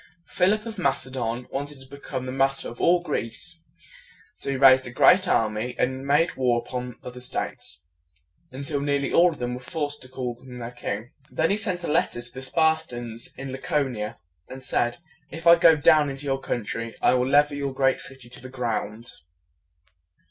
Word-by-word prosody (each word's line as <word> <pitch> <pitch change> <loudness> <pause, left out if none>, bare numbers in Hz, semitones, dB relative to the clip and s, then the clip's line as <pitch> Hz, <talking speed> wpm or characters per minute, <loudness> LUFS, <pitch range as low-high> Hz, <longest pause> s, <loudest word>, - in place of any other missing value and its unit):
Philip 210 +4 +2
of 225 -3 -6
Mac 140 -6 +1
e 130 - -11
don 120 -1 -3
wanted 145 +1 -5
to 130 - -14
become 135 -1 -6
the 130 - -4
master 135 +1 +1
of 120 - -8
all 175 0 +4
Greece. 120 -8 -4 0.7
So - - -5
he 135 - 0
raised 130 -1 +7
a - - -6
great 185 +9 +5
army, 110 -1 +1
and 130 +2 -1
made 150 +4 +3
war 125 -2 +2
upon 125 0 -5
the - - -9
other 125 0 -8
states, 125 - -4 0.7
until 140 +3 -3
nearly 140 -1 0
all 180 +1 +6
of 155 - -9
them 125 0 -3
were 125 - -5
forced 145 +1 -4
to 130 - -11
call 125 -2 -5
him 125 -1 -10
their 120 0 -6
king. 110 0 -5 0.2
Then 160 +3 +1
he - - +3
sent 185 -5 -1
a - - -2
letter 150 -5 +1
to 120 0 -8
the 130 - -7
Spartans 130 -6 -1
in 135 0 -6
La 130 - -5
co 145 0 +1
ni 120 -5 -5
a, 105 - -4 0.3
and 130 0 -9
said, 120 -1 0 0.3
"If 165 +1 -8
I 170 0 +9
go 165 -1 +6
down 150 -1 +5
into 135 +1 -7
your 135 -1 0
country, 115 -2 -4
I - - +4
will 125 0 +2
level 145 +1 +4
your 140 -1 -2
great 135 0 +2
city 135 -2 -8
to 120 - -9
the 130 - -9
ground." 115 -2 -3
130 Hz, 205 wpm, -25 LUFS, 125-145 Hz, 0.7 s, I